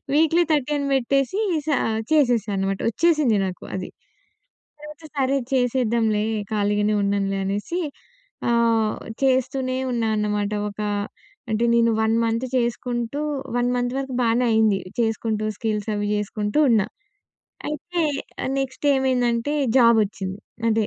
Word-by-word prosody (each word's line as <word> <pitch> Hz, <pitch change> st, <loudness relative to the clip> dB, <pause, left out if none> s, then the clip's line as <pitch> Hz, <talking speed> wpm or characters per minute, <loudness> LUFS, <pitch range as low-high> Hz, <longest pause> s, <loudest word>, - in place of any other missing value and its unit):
Weekly 325 Hz, +3 st, +4 dB
13 290 Hz, 0 st, +1 dB
పెట్టేసి 275 Hz, -, +1 dB, 0.3 s
సా 300 Hz, -, +3 dB, 0.4 s
చేసేశా 245 Hz, -8 st, +3 dB
అనమాట. 195 Hz, 0 st, -1 dB
వచ్చేసింది 300 Hz, -5 st, +2 dB
నాకు 185 Hz, -1 st, -6 dB
అది. 185 Hz, -1 st, -4 dB, 0.9 s
తర్వాత 300 Hz, +1 st, -11 dB
సరే 275 Hz, 0 st, +1 dB
చేసేద్దాంలే, 235 Hz, -4 st, +1 dB, 0.3 s
ఖాళీగానే 210 Hz, 0 st, +1 dB
ఉన్నానులే 200 Hz, -1 st, 0 dB
అనేసి 205 Hz, -, -2 dB, 0.7 s
ఆహ్, 230 Hz, -2 st, +2 dB, 0.3 s
చేస్తూనే 260 Hz, 0 st, +1 dB
ఉన్నా 230 Hz, -2 st, 0 dB
అన్నమాట. 210 Hz, 0 st, -1 dB, 0.2 s
ఒక 205 Hz, +1 st, -13 dB, 0.7 s
అంటే, 220 Hz, +2 st, +1 dB
నేను 230 Hz, 0 st, +4 dB
1 220 Hz, +1 st, +2 dB
మంత్ 230 Hz, +3 st, 0 dB
చేసుకుంటూ, 240 Hz, +2 st, -2 dB, 0.4 s
1 245 Hz, 0 st, +1 dB
మంత్ 245 Hz, 0 st, 0 dB
వరకు 270 Hz, -1 st, -3 dB
బానే 235 Hz, +1 st, +2 dB
అయింది. 220 Hz, -3 st, +3 dB, 0.2 s
చేసుకుంటూ, 225 Hz, -1 st, 0 dB
స్కిల్సవి 210 Hz, -2 st, -2 dB
జేసుకుంటూ 210 Hz, +4 st, -1 dB
ఉన్నా. 220 Hz, -5 st, +4 dB, 0.8 s
అయితే 340 Hz, +4 st, -3 dB, 0.6 s
నెక్స్ట్ 270 Hz, +2 st, -3 dB
ఏమైందంటే, 255 Hz, 0 st, +1 dB, 0.2 s
జాబొచ్చింది. 210 Hz, -5 st, +2 dB, 0.3 s
అదే 220 Hz, -1 st, +2 dB
235 Hz, 110 wpm, -23 LUFS, 210-265 Hz, 0.9 s, Weekly